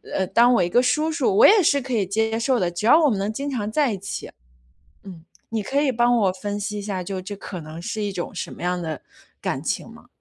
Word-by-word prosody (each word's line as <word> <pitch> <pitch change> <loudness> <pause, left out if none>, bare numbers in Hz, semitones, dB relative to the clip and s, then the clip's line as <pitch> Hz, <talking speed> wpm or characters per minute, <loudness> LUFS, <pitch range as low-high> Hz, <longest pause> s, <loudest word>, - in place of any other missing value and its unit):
呃， 190 - +1
当 235 +6 +4
我 185 - +3
一 175 - 0
个 245 - +4
叔 300 +6 +1
叔， 385 +5 +1
我 460 - +8
也 420 -1 +6
是 285 -2 +3
可 255 0 -5
以 205 -4 +1
接 220 +2 0
受 245 0 +1
的， 175 -1 0
只 175 +5 -4
要 310 +6 +7
我 - - +5
们 205 -4 -1
能 200 +2 -1
经 280 +4 -4
常 215 -5 -3
在 275 -4 +1
一 - - -4
起。 200 - -6 0.7
嗯。 175 -4 -11 0.3
你 220 -2 -2
可 275 +7 0
以 275 -3 +1
帮 240 +1 +3
我 195 -4 +2
分 205 +2 -4
析 210 +1 -4
一 205 - -5
下， 195 -3 -3
就 190 0 -4
这 205 +2 -7
可 185 -3 -7
能 155 +2 -9
是 215 +5 -4
一 205 -1 -2
种 180 +2 -5
什 - - -5
么 - - -11
样 180 0 -1
的 155 -3 -5 0.4
感 - - -3
情 - - -3
吗？ - - -15
210 Hz, 290 characters per minute, -23 LUFS, 190-250 Hz, 0.7 s, 我